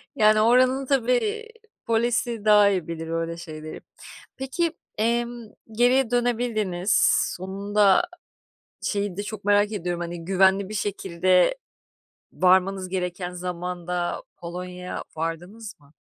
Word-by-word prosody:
Yani 215 0 +5
oranın 255 +3 +4
tabii, 255 -3 +1
eee, 430 - 0 0.4
polisi 230 -1 0
daha 210 -1 +6
iyi 185 -5 -1
bilir 165 -1 -5
öyle 165 0 -3
şeyleri. 155 -2 -8 0.6
Peki, 310 +6 -1 0.2
emm, 235 +1 -1 0.3
geriye 245 +2 +3
dönebildiniz. 220 -6 0 0.5
Sonunda; 200 - +2 0.8
şeyi 200 -3 -2
de 205 - -3
çok 210 -1 -7
merak 205 +1 +3
ediyorum, 175 -3 -3
hani, 170 -1 -5
güvenli 190 +1 +3
bir 215 - -7
şekilde 185 - +1 0.8
varmanız 185 0 +2
gereken 180 -1 -3
zamanda, 180 0 -4
Polonya'ya 180 +1 -6
vardınız 175 +6 -5
mı? 145 +1 -24
195 Hz, 110 wpm, -24 LUFS, 180-230 Hz, 0.8 s, daha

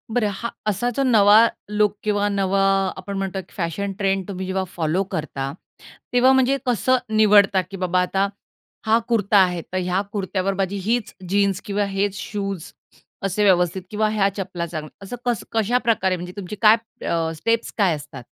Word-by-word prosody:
बरं 220 -4 +2
हा 235 +4 -4 0.2
असा 215 +4 0
जो 275 - +2
नवा 215 -5 +6 0.3
लूक 210 0 +1
किंवा 205 -1 +1
नवा 195 -1 +1 0.4
आपण 200 -1 -6
म्हणतो 195 0 -3
एक 185 - -11
फॅशन 195 +3 -3
ट्रेंड 195 -2 0
तुम्ही 190 -2 -5
जेव्हा 190 0 -1
फॉलो 170 +3 0
करता, 145 -7 -4 0.6
तेव्हा 250 +1 +5
म्हणजे 265 +1 +3
कसं 255 +1 +2 0.2
निवडता? 205 -3 +5
की 185 +2 -10
बाबा 185 0 +1
आता 195 +2 +1 0.6
हा 220 +1 +4
कुर्ता 210 -3 +2
आहे. 180 -3 +3
तर 185 - -6
ह्या 180 +1 0
कुर्त्यावर 195 -1 -1
माझी 195 +1 -2
हीचं 225 -4 -2
जीन्स 200 0 +1
किंवा 205 0 0
हेचं 195 0 -1
शूज 195 -5 -5 0.5
असे 195 +2 0
व्यवस्थित 180 -2 +3
किंवा 215 0 0
ह्या 200 -2 +2
चपला 185 -3 -3
चांगला 155 -2 -6 0.2
असं 220 - -6
कसं 240 -4 -1
कशाप्रकारे 225 -4 +1
म्हणजे 180 0 -7
तुमची 200 +1 -6
काय 215 0 +8 0.3
अ, 165 -1 0
स्टेप्स 230 +8 -1
काय 190 -6 +3
असतात? 140 -3 -10
195 Hz, 170 wpm, -22 LUFS, 185-210 Hz, 0.6 s, काय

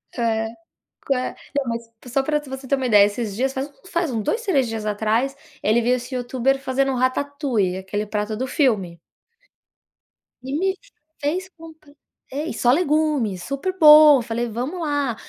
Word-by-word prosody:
É, 225 -2 0 0.6
que 275 - +2 0.4
não, 280 - +1
mas 230 0 -4 0.2
só 270 - +2
pra 300 +2 0
você 265 0 -7
ter 275 - +3
uma 260 -1 -2
ideia, 205 -3 +6
esses 205 -1 -4
dias, 265 +4 0
faz 270 +2 -3
um - - -24 0.2
faz 340 -3 0
uns 225 -3 -2
2, 460 - -1
3 275 - +1
dias 220 -1 -4
atrás, 220 +6 0 0.3
ele 220 +3 +3
viu 250 +2 +2
esse 250 +2 -7
YouTuber 255 +2 0
fazendo 270 0 0
um - - -2
ratatouille, 255 - 0
aquele 205 +2 -4
prato 210 +1 -3
do 260 +4 -2
filme 200 - 0 1.4
e 265 +1 -5
me 380 +2 0 0.4
fez 350 +6 -2
comprar 320 -4 -15 0.4
é 290 +4 -3
e - - -4
só 245 - +2
legumes, 300 - +1
super 275 +7 -3
bom. 300 -3 +9
Falei: 235 +1 -3
"Vamo 250 +11 -4
lá". 285 -6 -1
260 Hz, 175 wpm, -22 LUFS, 225-290 Hz, 1.4 s, bom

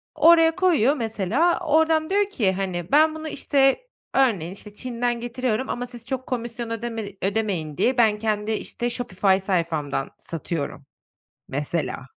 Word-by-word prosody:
Oraya 330 0 +6
koyuyor 320 -8 +3
mesela, 230 - +1
oradan 315 0 +2
diyor 405 +1 +2
ki, 215 - +1
hani, 185 -2 -3
"Ben 310 +2 +5
bunu," 315 0 -6
işte, 280 - +1 0.3
örneğin, 205 -11 +2
işte, 205 +1 -9
"Çin'den 240 0 -2
getiriyorum 240 0 -2
ama 245 0 -3
siz 240 -1 -10
çok 260 0 -4
komisyon 235 -1 -4
ödeme 230 -1 -4 0.2
ödemeyin 195 -7 -1
diye 255 +1 +2
ben 220 -3 +4
kendi, 215 0 -1
işte, 240 +2 -3
Shopify 195 -5 +1
sayfamdan 165 -8 -1
satıyorum." 165 -2 -4 0.6
mesela. 145 -1 -2
235 Hz, 140 wpm, -24 LUFS, 195-270 Hz, 0.6 s, Oraya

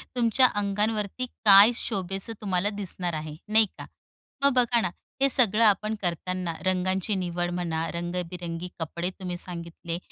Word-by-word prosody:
तुमच्या 245 +1 +4 0.2
अंगांवरती 210 +3 -1 0.2
काय 200 +2 +9
शोभेस, 195 -3 -3
तुम्हाला 195 -1 0
दिसणार 180 -3 -3
आहे, 155 -1 -5 0.2
नाही 220 +1 +6
का? - - -8 0.6
मग 280 -1 +5
बघा 245 -2 +3
ना, 185 - 0 0.3
हे 275 - +5
सगळं 230 -4 +4
आपण 215 0 +3
करताना, 180 0 -2
रंगांची 185 +2 0
निवड 175 -1 -2
म्हणा, 165 -2 -2
रंगबिरंगी 175 0 -4
कपडे 170 +2 -3
तुम्ही 180 -2 -4
सांगितले, 170 -1 -4
185 Hz, 135 wpm, -26 LUFS, 175-215 Hz, 0.6 s, काय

